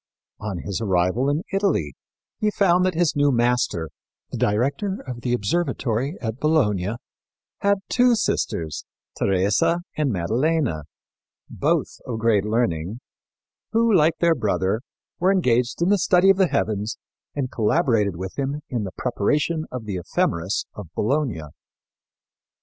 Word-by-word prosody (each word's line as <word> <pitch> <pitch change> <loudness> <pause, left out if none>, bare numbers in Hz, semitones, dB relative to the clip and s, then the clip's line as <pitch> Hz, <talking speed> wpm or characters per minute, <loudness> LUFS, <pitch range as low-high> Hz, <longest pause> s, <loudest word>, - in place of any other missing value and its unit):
On 100 -3 -4
his 100 +1 -3
arrival 95 +6 +1
in 150 +4 0
Italy 195 - +1 0.5
he 215 - +2
found 180 -3 +3
that 185 - -1
his 170 -1 +2
new 145 0 +3
master, 120 - +1 0.4
the - - -4
director 140 - 0
of 125 -2 -6
the 120 - -2
observatory 125 - -1
at 110 +1 -4
Bologna, 110 - +1 0.6
had 200 -1 +2
two 245 -1 +4
sisters, 80 - -1 0.3
Teresa 100 - +2
and 150 -4 0
Maddalena, 115 - 0 0.7
both - - 0
of 120 -3 -3
great 110 -3 +2
learning, 105 -3 -1 0.7
who, 230 0 +3
like 160 -3 +4
their 170 -1 +4
brother, 105 -5 0 0.4
were 185 +2 +3
engaged 125 -6 +1
in 175 - +2
the 205 -1 +4
study 180 +2 +5
of 195 - +1
the 190 -2 +4
heavens 105 - -1 0.4
and 135 -3 -2
collaborated 110 - +2
with 95 +8 -6
him 140 +2 -2
in 115 -5 -2
the 95 - -5
preparation 150 +7 0
of 125 -3 -5
the 100 -3 -3
Ephemeris 85 +1 -1
of 105 -4 -8
Bologna. 130 - 0
125 Hz, 140 wpm, -23 LUFS, 105-165 Hz, 0.7 s, study